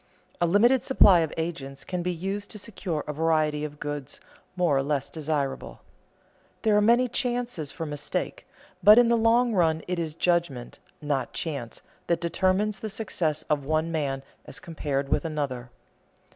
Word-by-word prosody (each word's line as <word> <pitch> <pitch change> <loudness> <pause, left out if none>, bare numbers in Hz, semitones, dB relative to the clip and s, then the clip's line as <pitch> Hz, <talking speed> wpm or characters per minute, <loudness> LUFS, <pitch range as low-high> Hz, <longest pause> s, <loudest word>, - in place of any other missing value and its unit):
A 175 - +4
limited 235 +8 +4
supply 200 -8 +6
of 160 -2 0
agents 140 -5 -4
can 180 -1 -3
be 180 +1 -1
used 195 +4 -4
to - - -4
secure 190 -7 -4
a 150 - -4
variety 155 -1 +1
of 150 -1 -6
goods, 145 -2 -5 0.4
more 175 -6 +2
or 135 - +3
less 140 -1 -2
desirable. 150 -3 -3 0.8
There 215 -2 +3
are 210 - +5
many 240 +4 +4
chances 245 - -2
for 165 - -5
mistake, 145 -1 -4 0.3
but 210 +2 +8
in 240 -1 +6
the 235 - +4
long 230 +1 +3
run 160 -4 +2
it 180 -1 -2
is 160 -2 -3
judgment, 170 -9 -1 0.2
not 135 -4 -1
chance, 140 -8 -5 0.2
that 170 - +1
determines 190 +4 0
the 220 - -5
success 170 -8 -2
of 150 -2 -1
one 155 +3 0
man 140 -4 -2 0.2
as - - -8
compared 145 -4 -3
with - - +1
another. 140 -6 -3
165 Hz, 165 wpm, -26 LUFS, 145-200 Hz, 0.8 s, but